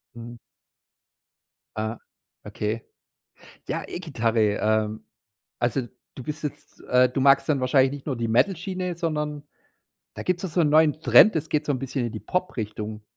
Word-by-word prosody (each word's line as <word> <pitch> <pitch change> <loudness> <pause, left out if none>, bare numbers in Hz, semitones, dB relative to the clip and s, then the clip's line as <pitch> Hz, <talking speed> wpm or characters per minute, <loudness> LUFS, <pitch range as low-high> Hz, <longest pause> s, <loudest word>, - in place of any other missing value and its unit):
Mhm. 120 0 -9 1.4
Ah, 110 +1 -3 0.4
okay. 110 +2 -3 0.8
Ja, - - -2
E-Gitarre, 120 -10 -2 0.2
ähm 110 0 0 0.6
also, 120 +2 +1 0.3
du 130 - -8
bist 150 +2 -6
jetzt, 150 - -7
äh 125 0 +4
du 130 +1 -2
magst 140 +3 +4
dann 140 -3 +2
wahrscheinlich 130 +1 +3
nicht 145 -1 -8
nur 140 -4 -2
die 115 -1 -1
Metal-Schiene, 180 - 0
sondern 150 -3 -3 0.7
da - - -6
gibt's 180 0 -1
doch 185 - -2
so 170 +2 +1
'n 150 - +3
neuen 155 0 +4
Trend. 130 - +7
Das 160 0 -2
geht 150 0 0
so 145 - +1
'n 130 - -2
bisschen 135 -2 -2
in 115 - -4
die 110 - -6
Pop-Richtung. 110 - -4
135 Hz, 160 wpm, -25 LUFS, 115-155 Hz, 1.4 s, Trend